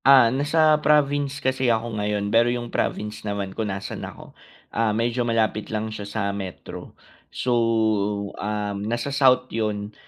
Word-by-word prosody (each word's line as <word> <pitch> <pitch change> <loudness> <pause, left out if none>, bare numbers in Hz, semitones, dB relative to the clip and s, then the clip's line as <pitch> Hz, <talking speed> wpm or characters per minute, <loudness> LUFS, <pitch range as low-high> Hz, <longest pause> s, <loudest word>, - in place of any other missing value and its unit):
Ah, 130 -4 +7
nasa 155 +2 +3
province 145 -2 +2
kasi 130 -2 0
ako 115 0 0
ngayon 105 0 -1
pero 115 +1 +5
'yung 120 -1 -3
province 105 +1 -2
naman 100 -2 -3
kung 110 0 -2
nasaan 95 0 -5
ako, - - -9 0.4
ah 115 -1 +2
medyo 120 +2 0
malapit 110 -2 0
lang 110 0 -3
siya 100 -1 -6
sa 110 - -3
metro. 95 -3 -8 0.3
So, 125 - -1 0.9
um, 105 -1 -2
nasa 120 +6 -2
South 135 -3 +4
'yun 105 -2 -2
115 Hz, 150 wpm, -24 LUFS, 105-130 Hz, 0.9 s, Ah